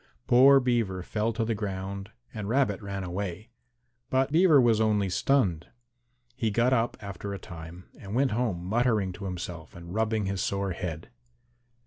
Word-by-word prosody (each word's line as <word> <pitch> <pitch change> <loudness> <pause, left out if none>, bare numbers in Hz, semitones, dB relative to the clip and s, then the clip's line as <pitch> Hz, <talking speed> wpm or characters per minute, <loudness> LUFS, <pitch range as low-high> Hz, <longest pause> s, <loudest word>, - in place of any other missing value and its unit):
Poor 135 +3 +7
Beaver 115 -8 0
fell 110 +4 -1
to 115 0 -1
the 115 - 0
ground 100 -1 -4 0.2
and 105 -2 -5
Rabbit 120 -6 +1
ran 100 -1 -4
away. 95 +4 -5 0.6
But 130 +1 +1
Beaver 160 -2 +6
was 115 -3 +4
only 105 -3 +2
stunned. 95 - +1 0.7
He 115 -3 0
got 120 +5 +2
up 120 -1 +1
after 100 0 -6
a - - -5
time 85 0 -10
and 100 +2 -6
went 135 0 +2
home 105 -7 -1
muttering 110 -2 +1
to 100 - -8
himself 90 -3 -6
and 85 +1 -9
rubbing 110 -1 0
his 95 -1 -2
sore 100 -1 -1
head. 85 -3 -5
105 Hz, 160 wpm, -28 LUFS, 95-120 Hz, 0.7 s, Poor